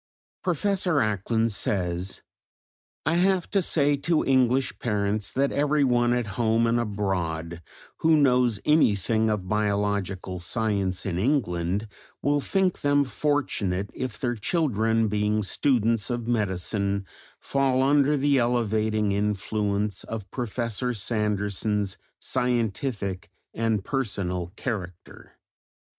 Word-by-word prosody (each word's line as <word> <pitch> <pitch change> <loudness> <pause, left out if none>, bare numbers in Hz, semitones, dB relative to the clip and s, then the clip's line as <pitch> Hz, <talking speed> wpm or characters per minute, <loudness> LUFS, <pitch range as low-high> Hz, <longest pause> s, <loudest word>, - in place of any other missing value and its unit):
Professor 185 +1 +1
Acland 110 -1 +1
says: 90 -2 -1 0.8
"I 160 - +2
have 185 0 +2
to 200 - +3
say 145 -4 +3
to 160 +3 +1
English 130 0 +2
parents 105 -2 -1
that 140 +1 +1
everyone 140 -5 +2
at 125 -1 0 0.2
home 115 0 +3
and 115 +1 +2
abroad, 90 -6 -2 0.4
who 160 -1 +4
knows 125 -6 +3
anything 110 - +3
of 105 -4 -2
biological 100 -3 -1
science 100 -1 -1
in 90 -3 -2
England, 100 - 0 0.3
will 145 0 +1
think 190 +3 0
them 145 0 +3
fortunate 125 -10 -1
if 130 -4 -4
their 120 -2 -1
children 115 - +1
being 105 +1 0
students 115 -1 +1
of 120 -1 -3
medicine, 100 -2 -1 0.3
fall 135 -2 +1
under 145 +1 +3
the 140 0 +3
elevating 110 -3 +1
influence 105 0 -1
of 105 -4 -6
Professor 120 0 -2
Sanderson's 105 -1 -1 0.2
scientific 110 -6 -1 0.2
and 110 -3 0
personal 90 -9 -2
character." 90 -8 -6
110 Hz, 110 wpm, -26 LUFS, 100-130 Hz, 0.8 s, who